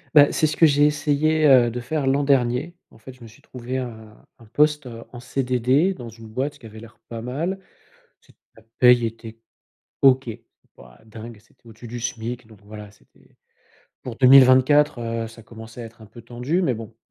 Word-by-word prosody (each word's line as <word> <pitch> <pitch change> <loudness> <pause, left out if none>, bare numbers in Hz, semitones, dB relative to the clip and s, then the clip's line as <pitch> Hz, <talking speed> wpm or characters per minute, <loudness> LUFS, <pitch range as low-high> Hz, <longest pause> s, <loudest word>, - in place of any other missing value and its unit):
Bah 145 -1 +7
c'est - - +1
ce 155 0 -2
que 165 - +6
j'ai 145 -1 +3
essayé, 150 +1 +1
heu, 125 -4 +5
de 125 - -5
faire 140 +4 -3
l'an 140 +2 +1
dernier. 135 +4 0
En - - -20
fait 120 +4 -13
je 125 - -23
me - - -11
suis 110 - -20
trouvé 125 +1 -7
un 110 -4 -9
un 115 - -17
poste, 150 +5 0
heu, 115 -1 -10
en 120 - -10
CDD 130 +7 0
dans 120 -8 -10
une 115 0 -14
boîte 135 +6 -5
qui 120 - -16
avait 110 0 -12
l'air 115 0 -16
pas 115 -1 -7
mal, 155 +11 -4 0.6
c'était, - - -26 0.2
la - - -19 0.2
paye 125 -1 +5
était 115 0 -9 0.6
OK, 130 -2 +3 0.4
pas - - -18
dingue, 110 +1 -11
c'était 115 +2 -29
au-dessus 115 +1 -13
du 120 +1 -7
SMIC 120 0 -5
donc 110 -3 -19
voilà 105 0 -11
c'était - - -28 0.7
pour 120 -3 -8
2024, 130 +2 +5
heu, 115 0 -4
ça 115 0 -15
commençait 115 +1 -12
à - - -8
être 115 0 -14
un 110 - -13
peu 115 +3 -15
tendu, 125 +10 -3
mais 160 - +1
bon 115 -1 -9
125 Hz, 200 wpm, -22 LUFS, 115-140 Hz, 0.7 s, Bah